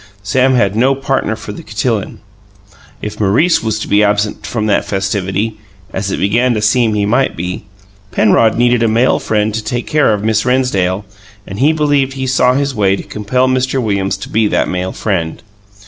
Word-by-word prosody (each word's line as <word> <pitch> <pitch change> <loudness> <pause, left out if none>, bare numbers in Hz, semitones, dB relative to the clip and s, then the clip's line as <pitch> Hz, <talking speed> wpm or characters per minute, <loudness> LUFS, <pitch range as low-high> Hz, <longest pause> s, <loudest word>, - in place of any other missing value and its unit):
Sam 130 +6 +2
had 100 -4 +1
no 130 +4 +3
partner 135 -5 -1
for 105 - -8
the - - -8
cotillon. 110 0 -3 0.8
If 105 - -5
Maurice 110 - +3
was 110 -2 -1
to - - -4
be 105 +1 +3
absent 105 0 0
from 110 -3 -2
that 100 -2 +2
festivity 100 +2 -2 0.3
as 95 +1 -2
it - - -2
began 120 +5 +2
to 105 - -1
seem 110 0 +2
he 105 -1 +1
might 125 +6 +1
be 90 +3 -5 0.5
Penrod 110 +1 +3
needed 120 0 +3
a 115 - +3
male 115 +4 +2
friend 105 0 0
to 110 0 -3
take 120 +3 -3
care 150 -6 +2
of 105 -1 -1
Miss 110 -1 +1
Rennsdale 105 -7 0 0.4
and 100 +2 -8
he 145 +4 +4
believed 145 -4 +1
he 135 -1 -4
saw 125 -1 +2
his 140 0 0
way 100 -4 +2
to - - -7
compel 125 +5 -1
Mr. 130 +1 0
Williams 100 -4 -1
to 95 - -8
be 110 0 +2
that - - 0
male 90 +1 -2
friend. 85 -6 -3
110 Hz, 195 wpm, -15 LUFS, 100-125 Hz, 0.8 s, he